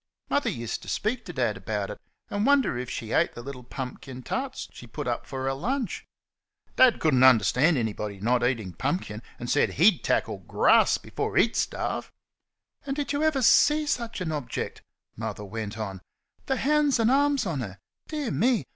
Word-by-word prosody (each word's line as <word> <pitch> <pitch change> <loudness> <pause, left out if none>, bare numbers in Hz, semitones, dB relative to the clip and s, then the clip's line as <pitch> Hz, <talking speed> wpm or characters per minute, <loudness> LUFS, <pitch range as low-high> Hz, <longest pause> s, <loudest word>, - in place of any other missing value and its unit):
Mother 285 - +2
used 115 -2 -4
to - - -12
speak 230 +3 -1
to 175 - -7
Dad 120 -7 0
about 100 +1 -3
it, - - -9 0.3
and 205 0 0
wonder 275 - +3
if 125 0 -4
she 110 -1 -5
ate 170 - +2
the 120 - -8
little 135 -1 -7
pumpkin 130 0 -7
tarts - - -3
she - - -11
put - - -6
up - - -2
for 130 -1 -5
her 135 0 0
lunch. 235 - -3 0.7
Dad 255 -2 +5
could 155 -2 +2
n't 130 0 +4
understand 130 - +5
anyone 105 -3 -3
not 120 +1 +2
eating 115 -7 -1
pumpkin, 135 - -2 0.2
and 120 - -6
said 145 - +2
HE'D 180 +4 +4
tackle - - 0
GRASS - - +4
before - - -4
he'd - - +4
starve. - - -2 0.7
"And 275 -1 -3
did 290 0 -2
ever 305 0 +2
y' - - -1
see 300 +5 +5
such 235 -7 -2
a 165 -3 -2
object?" 145 -5 -4 0.3
Mother 105 - -5
went 110 +1 -5
on. 100 -4 -5 0.5
"The 265 - +1
hands 290 -1 +2
an' 225 +2 +3
arms 285 -1 +3
on 165 -7 -2
her! 100 -6 -6 0.3
Dear 295 -7 -3
me! 245 -1 +2
145 Hz, 185 wpm, -26 LUFS, -, 0.7 s, Dad